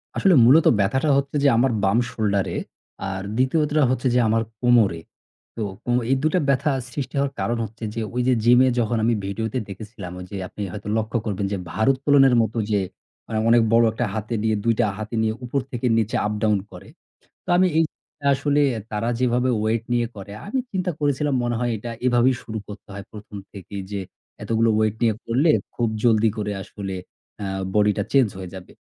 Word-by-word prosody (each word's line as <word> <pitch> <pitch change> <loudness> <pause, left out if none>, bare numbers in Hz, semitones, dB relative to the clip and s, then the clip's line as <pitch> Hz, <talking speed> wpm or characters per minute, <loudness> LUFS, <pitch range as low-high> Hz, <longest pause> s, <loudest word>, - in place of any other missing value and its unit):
আসলে 190 -2 +4
মূলত 150 +6 +6
ব্যথাটা 130 +10 +1
হচ্ছে 140 +1 -2
যে - - +6
আমার 130 +1 +3
বাম 100 +4 +3
shoulder 100 -3 0
এ। - - -1 0.5
আর 95 0 -4
২য় 130 +6 +2
টা 150 -1 +3
হচ্ছে 130 0 0
যে - - +5
আমার 115 +1 +2 0.2
কোমরে। 115 -9 +4 0.6
তো 110 - -3 0.2
কো 120 - -2 0.2
এই 135 - +4
২ 155 - +2
টা - - +4
ব্যথা 140 +2 +2 0.2
সৃষ্টি 140 +2 -5
হওয়ার 140 0 +1
কারণ 120 0 0
হচ্ছে 110 +2 -12
যে, 115 - -2
ওই 125 - +1
যে 130 - +4
gym 125 +1 +6
এ - - +3
যখন 115 0 0
আমি 115 +1 +3
video 105 +3 -3
তে 130 - 0
দেখেছিলাম 100 -2 -8
ওইযে 90 +2 -8
আপনি 105 - -9
হয়তো 105 +1 -8
লক্ষ্য 110 +2 -1
করবেন 100 -1 -2
যে 100 - -1
ভারোত্তোলনের 135 +2 +4
মতো 110 +1 -2
যে 100 - +3 0.7
অনেক 120 0 +6
বড় 115 0 +6
একটা 120 +2 -2
হাতে 110 +2 -4
নিয়ে 110 -1 +2
২ 115 -1 +3
টা - - +4
হাতে 110 +2 -5
নিয়ে 110 0 +1
উপর 135 +3 -1
থেকে 120 0 -3
নিচে 110 0 0
up-down 105 0 +1
করে। - - -12 0.6
তো - - -25
আমি 185 +1 +5
এই 165 - +5 0.5
আসলে 145 +1 +1 0.3
তারা 110 +2 -2
যেভাবে 125 0 +1
weight 115 +1 0
নিয়ে 120 -1 +2
করে 100 +1 -9
আমি 260 +6 -2
চিন্তা 185 -1 -1
করেছিলাম 145 0 +1
মনে 120 -1 -1
হয় 120 -1 0
এটা 115 +3 -6 0.2
এভাবেই 125 +1 +4
শুরু 110 -1 -5
করতে 105 0 -10
হয় 100 0 -7
১ম 105 -1 -10 0.2
থেকেই 100 0 -7
যে 100 - -2 0.4
এতগুলো 115 0 +2
weight 110 0 +1
নিয়ে 110 -2 +3
করলে 135 +8 +2 0.2
খুব 120 -2 0 0.2
জলদি 110 -1 +4
করে 105 -1 -2
আসলে 100 -2 -6 0.5
আ - - -2 0.3
body 105 0 +4
টা - - +2
change 130 -7 +4
হয়ে 90 -2 -7
যাবে। 90 - -11
115 Hz, 200 wpm, -23 LUFS, 105-130 Hz, 0.7 s, মূলত